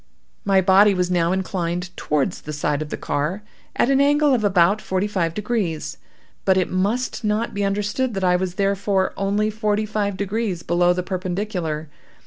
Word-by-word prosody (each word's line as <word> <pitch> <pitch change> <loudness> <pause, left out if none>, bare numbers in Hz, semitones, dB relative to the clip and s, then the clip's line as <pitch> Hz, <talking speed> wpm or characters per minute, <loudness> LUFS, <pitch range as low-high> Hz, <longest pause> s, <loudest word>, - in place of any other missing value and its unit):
"My 195 -1 +4
body 195 +2 +5
was 180 0 0
now 170 -1 +2
inclined 180 -1 -2
towards 150 +4 -1
the 150 - -7
side 145 0 -1
of 155 - -5
the - - -4
car, 170 +9 -2 0.3
at 255 - +2
an 275 0 +4
angle 290 0 +4
of 235 -4 +1
about 195 +1 +3
forty 190 +1 -1
five 180 -6 -1
degrees; 185 -8 -2 0.5
but 190 -1 +3
it 185 - 0
must 215 +8 -1
not 215 +2 0
be 200 - -2
understood 210 +5 -1
that 195 - -2
I 180 -1 +4
was 180 0 -2
therefore 195 -1 0
only 205 +2 0
forty 215 0 0
five 205 -2 -2
degrees 200 -3 -2
below 175 +1 +2
the 180 0 -1
perpendicular. 180 -4 -3
195 Hz, 175 wpm, -22 LUFS, 180-210 Hz, 0.5 s, body